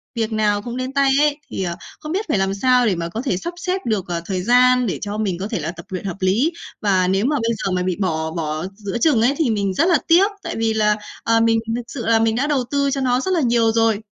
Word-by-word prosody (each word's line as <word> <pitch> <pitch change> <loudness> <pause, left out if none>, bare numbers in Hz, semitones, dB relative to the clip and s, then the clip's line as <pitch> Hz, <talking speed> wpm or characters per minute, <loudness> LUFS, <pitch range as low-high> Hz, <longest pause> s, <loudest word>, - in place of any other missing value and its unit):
việc 225 -1 -1
nào 210 -2 +1
cũng 240 +3 -6
đến 255 +1 -4
tay 275 -1 +3
ấy, 295 -1 +2
thì, - - -3
ờ, 170 -2 -3 0.2
không 305 - -7
biết 395 +5 -1
phải 215 - +2
làm 195 0 0
sao 250 +4 +3
để 205 -5 +2
mà 170 0 -4
có 220 +7 -4
thể 255 -9 -1
sắp 345 - -5
xếp 370 +1 -2
được, 215 -5 -1
ờ, 170 -1 -3
thời 185 -1 -2
gian 250 +2 +4
để 190 - -2
cho 205 0 -4
mình 195 -5 -1
có 195 - -3
thể 220 - -3
là - - -3
tập 170 -1 -12
luyện 185 0 -5
hợp 190 -2 -4
lý. 205 - +2 0.3
Và 190 -3 +2
nếu 195 +3 +1
mà 295 +3 +1
bây 230 +1 0
giờ 195 - 0
mà 180 0 0
bị 185 -1 -1
bỏ 160 -3 -1
bỏ 155 -1 -3
giữa 205 +1 -4
chừng 245 -2 +3
ấy, 245 +4 +3
thì 315 -7 +1
mình 200 -3 0
rất 320 - +2
là 340 - +5
tiếc, 370 +5 +5
tại - - -4
vì 225 0 +1
là, 210 -1 +2 0.3
ờ, 230 0 +3
mình 225 0 +3 0.2
thực 240 - -2
sự 245 -2 -6
là 225 -1 +4
mình 225 0 +2
đã 275 +4 0
đầu 285 -4 +1
tư 280 -1 +1
cho 275 0 -1
nó 250 -1 +2
rất 375 - -2
là 340 - +2
nhiều 235 -3 +3
rồi. 225 -2 +2
225 Hz, 290 wpm, -20 LUFS, 195-255 Hz, 0.3 s, là